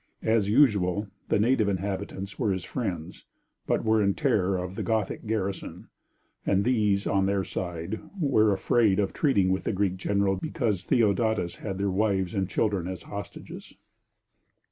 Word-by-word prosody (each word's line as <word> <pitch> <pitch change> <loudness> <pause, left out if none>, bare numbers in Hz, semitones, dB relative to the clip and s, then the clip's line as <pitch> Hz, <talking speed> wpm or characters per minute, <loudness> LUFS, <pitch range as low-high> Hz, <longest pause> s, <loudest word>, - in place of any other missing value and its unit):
As 110 -3 +2
usual, 105 -6 +3 0.2
the - - +3
native 110 -1 +3
inhabitants 100 +1 -4
were 110 -6 +1
his 95 -2 -2
friends, 95 -10 -5 0.4
but - - 0
were 110 0 +3
in 100 -1 +2
terror 100 -9 +1
of 90 0 -4
the - - -4
Gothic 110 -1 -1
garrison, 100 -3 -3 0.5
and 100 0 +2
these, 105 -5 +2
on 95 -1 +2
their 100 -1 +1
side, 90 +2 -4 0.2
were 110 -9 +3
afraid 100 +1 +2
of 100 -2 0
treating 100 - +2
with 95 - 0
the - - 0
Greek 95 -1 0
general 100 0 +1
because 105 -1 -2
Theodatus 105 -5 +1
had 95 -3 -5
their 100 0 0
wives 95 -2 0
and 95 -1 -1
children 100 -6 0
as 95 -1 -6
hostages. 100 0 -9
100 Hz, 155 wpm, -27 LUFS, 95-110 Hz, 0.5 s, usual